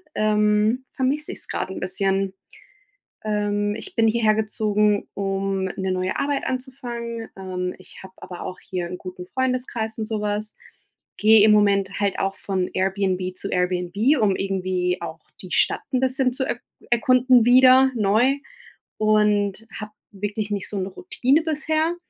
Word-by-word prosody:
ähm, 215 +3 +2
vermisse 280 +3 -1
ich - - -6
es - - -6
gerade 190 - -3
'n - - -5
bisschen. 195 +1 -1 0.9
Ähm, 205 -1 0
ich 225 - -7
bin 225 -1 +3
hierhergezogen, 215 -2 +1
um 195 -1 -2
'ne 190 0 -3
neue 185 0 -1
Arbeit 280 -1 -1
anzufangen. 240 -3 -5
Ähm, 180 -1 -4
ich 185 - -13
habe 190 0 -13
aber 180 - -9
auch 185 - -6
hier 180 -2 -4
'n 180 +1 -6
guten 180 0 -9
Freundeskreis 250 -2 -2
und 220 - -2
sowas. 210 -1 -3 0.6
Gehe 215 0 +6
im 215 - +6
Moment 200 -1 +2
halt 200 -2 0
auch 195 0 -1
von 190 -2 -2
Airbnb 185 -1 -1
zu 195 - -5
Airbnb, 180 - +1
um 210 -4 +3
irgendwie 185 -2 -1
auch - - -6 0.2
die - - -9
Stadt - - +2
'n 255 - +2
bisschen 260 0 +2
zu 265 +1 -2
er - - -2 0.3
erkunden 250 +1 +4
wieder 255 +2 +6
neu 225 +5 +3 0.6
und 210 -1 +2
habe 215 -1 -7 0.2
wirklich 205 +1 -4
nicht 200 -2 -3
so 205 - -3
'ne 190 - -2
Routine 285 - +1
bisher, 315 +1 0
210 Hz, 150 wpm, -23 LUFS, 195-240 Hz, 0.9 s, Gehe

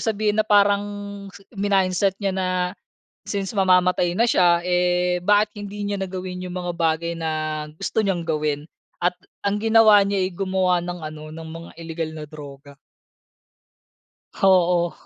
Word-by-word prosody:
sabihin, 215 -1 +1
na 215 - -24
parang 205 -1 +4 0.7
minindset 195 -1 +1
niya 195 -2 -1
na 190 -1 -1 0.8
since 195 -2 -3
mamamatay 180 -2 +3
na 230 +6 +2
siya, 175 -3 +4
eh, 180 0 +1
bakit 210 +1 +3
hindi 205 0 -7
niya 200 0 -2
na 190 -1 -4
gawin 185 -1 -5
yung 180 - -6
mga 175 -1 -3
bagay 165 +1 0
na 165 -1 -2 0.4
gusto 190 +7 -1
niyang 185 -3 0
gawin. 150 -2 -1 0.4
At 175 +1 +1 0.2
ang 200 +1 0
ginawa 220 -1 +6
niya'y 195 -2 0
gumawa 185 -2 +1
ng 175 -1 -5
ano, 155 0 -7
ng 160 0 -8
mga 165 +1 -9
ilegal 165 -1 -4
na 155 -1 -7
droga. 140 -2 -11 1.6
Oo. 180 -2 +3
180 Hz, 145 wpm, -22 LUFS, 170-200 Hz, 1.6 s, ginawa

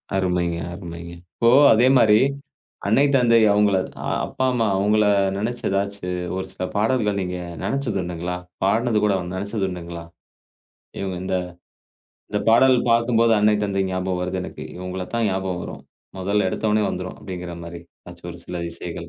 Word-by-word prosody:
அருமைங்க, 90 -3 0 0.2
அருமைங்க. 85 -1 -8 0.2
இப்போ 115 - +3 0.2
அதே 120 +3 +4
மாரி 105 -3 +6 0.7
அன்னை, 110 +7 +4
தந்தை 120 -3 +5
அவங்கள 105 -1 +3 0.5
அப்பா, 130 - -2
அம்மா 115 -3 +1
அவங்கள 105 +2 +3 0.3
நெனைச்சு 120 +4 -3
ஏதாச்சு 100 -1 -2 0.3
ஒரு 95 0 -3
சில - - -6
பாடல்கள் 105 -2 +1
நீங்க 90 -1 -3 0.3
நெனைச்சதுண்டுங்களா? 90 -9 -2 0.3
பாடுனது 110 +3 +2
கூட 105 -1 +3
வேணா, 90 -1 -5
நெனைச்சதுண்டுங்களா? 95 -4 -4 1.0
இவங்க 95 -2 -3
இந்த 95 0 0 0.9
இந்தப் 105 - -2
பாடல் 130 +3 +6
பாக்கும்போது 115 0 +3
அன்னை, 105 0 +4
தந்தை 100 -1 0
ஞாபகம் 95 -1 -2
வருது 90 +1 -2
எனக்கு. - - -8
இவங்களைத்தான் 95 +5 -3
ஞாபகம் 95 -2 -2
வரும். - - -8 0.4
முதல்ல 100 +2 +1
எடுத்த 110 - -1
ஒன்னே 105 0 +2
வந்துரும். 90 0 -5
அப்டீங்கிற 90 -2 -6
மாரி 85 0 -8 0.2
ஏதாச்சு - - -11
ஒரு - - -11
சில 90 -1 -4
இசைகள் 85 0 -7
95 Hz, 140 wpm, -22 LUFS, 90-110 Hz, 1.0 s, மாரி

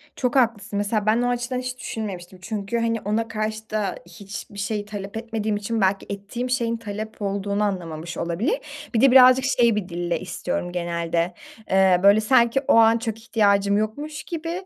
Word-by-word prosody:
Çok 250 0 -1
haklısın. 230 -5 +1
Mesela 205 +1 0
ben 220 +3 +3
o 245 - +1
açıdan 245 +1 -2
hiç 255 0 -5
düşünmemiştim. 190 -6 -6
Çünkü, 210 +3 -3
hani, 230 -1 0
ona 220 +3 -1
karşı 220 0 -4
da 210 -3 -1
hiçbir 200 +2 -9
şey 205 +1 -2
talep 205 0 -6
etmediğim 225 -2 -2
için 220 +2 -2
belki 195 +1 +1
ettiğim 200 +5 -4
şeyin 235 -2 0
talep 215 0 -7
olduğunu 200 +1 -1
anlamamış 170 -4 -4
olabilir. 205 - -1 0.3
Bir 225 - +2
de 270 -1 +6
birazcık 255 0 +7
şey 235 -3 +3
bir 200 -3 -3
dille 175 -1 -2
istiyorum 175 -1 -4
genelde, 170 0 -1 0.4
eee, 190 -1 +4
böyle, 200 +2 +6
sanki 240 +3 +3
o - - +5
an 230 0 +6
çok 225 -1 -4
ihtiyacım 200 -3 +2
yokmuş 290 +8 -3
gibi 340 +2 -5
215 Hz, 170 wpm, -23 LUFS, 195-235 Hz, 0.4 s, birazcık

